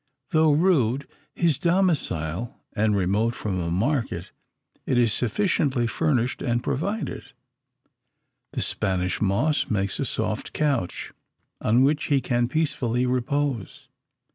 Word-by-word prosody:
Though 155 -1 +4
rude 140 -6 +2 0.3
his 165 -6 +2
domicile, 120 - 0
and 105 0 +2
remote 100 +5 +1
from 95 -4 -2
a 85 -1 -2
market, 100 - -1 0.6
it 130 - +2
is 115 -3 +3
sufficiently 130 - +1
furnished 130 -1 0
and 120 -2 0
provided. 195 +13 -3 1.2
The - - -2
Spanish 90 -1 -1
moss 110 +10 +1
makes 100 -3 -1
a - - 0
soft - - -3
couch, 140 -12 -1 0.5
on 120 +4 +4
which 145 +2 +2
he 140 -2 +3
can 120 -2 0
peacefully 130 -5 0
repose. 130 - -2
125 Hz, 115 wpm, -25 LUFS, 105-150 Hz, 1.2 s, Though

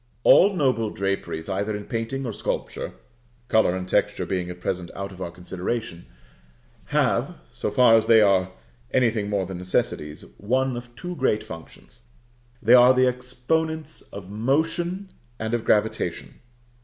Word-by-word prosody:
All 200 +1 +6
noble 130 -9 +1
draperies, 95 -5 -3
either 100 +2 -2
in 105 - -9
painting 120 +4 -3
or 115 - -3
sculpture - - -4 0.5
(color 110 -5 +3
and 90 0 -4
texture - - 0
being 90 -2 -2
at 90 0 -8
present 90 -1 -3
out 100 0 -5
of 95 -1 -11
our 85 - -3
consideration), 90 - -5 0.8
have, - - +1 0.2
so - - -3
far 115 +2 +5
as 110 -1 +4
they 115 -1 +7
are 95 -3 +3 0.4
anything 115 -5 +1
more 100 -2 0
than 90 -1 -6
necessities, 75 -4 -2
one 130 +4 0
of 120 0 -9
two 180 +6 -6
great 130 -7 +1
functions; 80 +8 -12 0.6
they 115 +3 +5
are 125 +1 +8
the 130 0 +4
exponents 155 +6 -2
of 100 -1 -9
motion 165 - -1 0.3
and 110 +1 -3
of 120 -1 0
gravitation. 105 -5 0
110 Hz, 150 wpm, -24 LUFS, 95-130 Hz, 0.8 s, are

